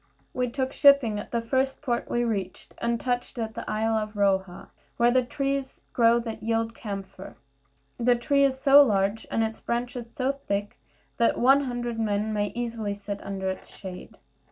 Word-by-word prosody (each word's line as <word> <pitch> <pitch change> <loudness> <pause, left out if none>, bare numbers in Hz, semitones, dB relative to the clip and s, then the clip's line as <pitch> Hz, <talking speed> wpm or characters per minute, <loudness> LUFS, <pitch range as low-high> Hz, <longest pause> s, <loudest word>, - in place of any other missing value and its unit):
We 250 -1 -1
took 260 +1 -2
shipping 280 -7 +5
at 210 - -8
the 235 - -1
first 265 +3 0
port 240 -4 -1
we 240 - +1
reached, 200 -6 -4
and 235 0 0
touched 245 +1 -2
at 220 -1 -3
the 230 - -6
isle 220 +1 0
of 215 -1 -2
Roha, 190 -3 0 0.3
where 240 0 +4
the 255 +1 +4
trees 275 +2 -3
grow 230 -1 +5
that 225 -2 -6
yield 225 0 -1
camphire. 195 -3 -7 0.6
This 245 0 +3
tree 280 +3 +2
is 265 -1 +2
so 280 +1 +8
large, 205 -4 +1
and 225 - +1
its 220 0 -3
branches 240 0 -3
so 260 +2 0
thick, 205 -7 -4 0.4
that 235 - +2
one 270 +3 +5
hundred 240 -2 -3
men 215 0 0
may 205 -1 0
easily 230 -4 -3
sit 200 0 -6
under 195 -1 -4
its 190 - -9
shade. 185 -2 -10
230 Hz, 180 wpm, -26 LUFS, 210-250 Hz, 0.6 s, so